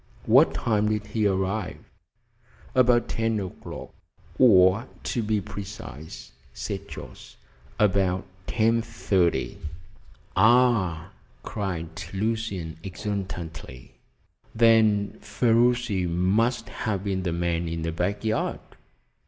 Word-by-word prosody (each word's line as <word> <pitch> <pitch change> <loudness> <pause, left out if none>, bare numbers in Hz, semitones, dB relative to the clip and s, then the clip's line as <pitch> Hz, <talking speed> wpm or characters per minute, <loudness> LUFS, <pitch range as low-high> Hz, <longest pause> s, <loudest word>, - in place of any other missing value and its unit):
"What - - +5
time 105 -2 +1
did 105 -1 -1
he 110 -2 +2
arrive?" 95 +1 -1 1.0
"About 125 -2 +4
ten 115 -1 0
o'clock, 95 -2 -8 0.5
or, 100 -1 +6 0.2
to 120 - -1
be 105 -1 0
precise," 100 -6 -9 0.2
said 65 0 -5
Jorce, - - -10 0.4
"about 95 -4 +2 0.2
ten 115 +1 +2
thirty." 90 - 0 0.8
"Ah!" 110 -6 +3 0.3
cried 90 -6 -4 0.3
Lucian 100 -6 -2
exultantly, 90 - -6 0.6
"then 110 -3 +4
Ferruci 115 -2 +2
must 105 +7 +1
have 100 -4 -3
been 95 -2 -1
the 90 -2 -2
man 85 0 -1
in 80 0 -3
the 80 - -1
back 95 +6 -2
yard!" 110 0 0
100 Hz, 100 wpm, -26 LUFS, 90-110 Hz, 1.0 s, or